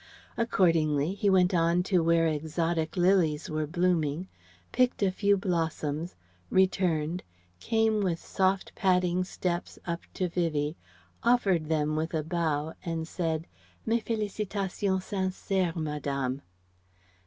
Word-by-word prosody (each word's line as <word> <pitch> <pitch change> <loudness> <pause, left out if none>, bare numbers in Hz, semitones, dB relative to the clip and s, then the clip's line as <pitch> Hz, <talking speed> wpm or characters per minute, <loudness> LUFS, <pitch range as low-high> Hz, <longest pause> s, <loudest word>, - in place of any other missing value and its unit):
Accordingly 165 -8 +2
he 205 0 +1
went 185 -1 +4
on 170 +1 +3
to 180 -3 +2
where 165 0 +3
exotic 160 +2 -1
lilies 175 -5 +2
were 155 0 -1
blooming, 175 -1 0 0.4
picked 250 -4 +2
a 190 - +3
few 200 +1 +2
blossoms, 165 -4 -2 0.3
returned, 180 -3 +1 0.4
came 220 - +1
with 180 -4 0
soft 190 +2 0
padding 180 -1 +2
steps 180 -1 -3
up 170 -1 -3
to 185 - 0
Vivie, 160 -3 -1 0.5
offered 195 -10 +2
them 155 -1 +1
with 160 +2 -2
a 155 - 0
bow 160 -2 -1
and 165 -1 -2
"Mes 160 - -9 0.8
félicitations 200 -3 -2
sincères, 190 -2 -1
Madame." 140 -4 -2
175 Hz, 115 wpm, -28 LUFS, 155-190 Hz, 0.8 s, went